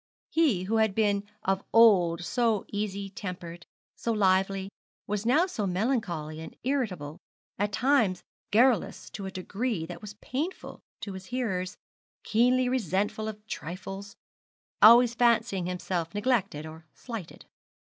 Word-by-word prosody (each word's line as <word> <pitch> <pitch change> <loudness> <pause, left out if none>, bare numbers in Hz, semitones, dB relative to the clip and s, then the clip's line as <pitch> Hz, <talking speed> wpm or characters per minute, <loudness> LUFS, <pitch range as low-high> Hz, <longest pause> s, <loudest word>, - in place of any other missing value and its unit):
He 280 - +2
who 220 +4 0
had 220 -3 +2
been 205 -2 +1 0.2
of 195 0 0
old 180 -7 +5
so 230 -3 +1
easy 200 -1 -3
tempered, 180 -3 -7 0.3
so 230 - -2
lively, 195 -2 +2 0.4
was 210 +2 -2
now 300 +9 +4 0.2
melancholy 180 - -1
and 160 - -9
irritable, 190 - -2 0.4
at 205 +1 0
times 220 -5 +2 0.3
garrulous 240 +3 +2
to 195 -2 -6
a - - -6
degree 195 0 -3
that 175 +1 -9
was 205 -1 -9
painful 295 - -5 0.2
to 200 - -5
his 190 0 -9
hearers, 190 -8 -2 0.5
keenly 250 +3 +3
resentful 215 -2 -1
of 210 -1 -7
trifles, 195 +3 -7 0.7
always 235 +2 +8
fancying 230 -6 +2
himself 180 -1 -3
neglected 205 - 0
or 160 0 -11
slighted. 230 -9 -8
205 Hz, 125 wpm, -28 LUFS, 185-230 Hz, 0.7 s, always